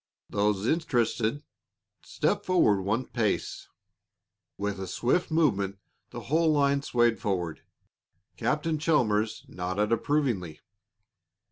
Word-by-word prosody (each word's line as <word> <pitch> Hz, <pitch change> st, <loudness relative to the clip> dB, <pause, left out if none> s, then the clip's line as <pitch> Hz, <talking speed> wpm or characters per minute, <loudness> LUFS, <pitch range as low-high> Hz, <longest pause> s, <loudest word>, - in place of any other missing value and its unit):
Those 105 Hz, -1 st, +1 dB
interested, 125 Hz, -3 st, 0 dB, 0.6 s
step -, -, -1 dB
forward 140 Hz, -, +3 dB
one 110 Hz, +7 st, -1 dB
pace." 110 Hz, -4 st, -2 dB, 0.9 s
With 100 Hz, 0 st, -3 dB
a 95 Hz, -, -5 dB
swift 130 Hz, -, 0 dB
movement 100 Hz, -, +1 dB, 0.3 s
the -, -, -7 dB
whole 160 Hz, +4 st, +2 dB
line 140 Hz, -1 st, +2 dB
swayed 120 Hz, -4 st, +2 dB
forward. 90 Hz, -5 st, -2 dB, 0.7 s
Captain 155 Hz, +1 st, -1 dB
Chalmers 110 Hz, -9 st, +1 dB
nodded 95 Hz, +4 st, -2 dB
approvingly. 115 Hz, -, 0 dB
115 Hz, 100 wpm, -28 LUFS, 100-150 Hz, 0.9 s, forward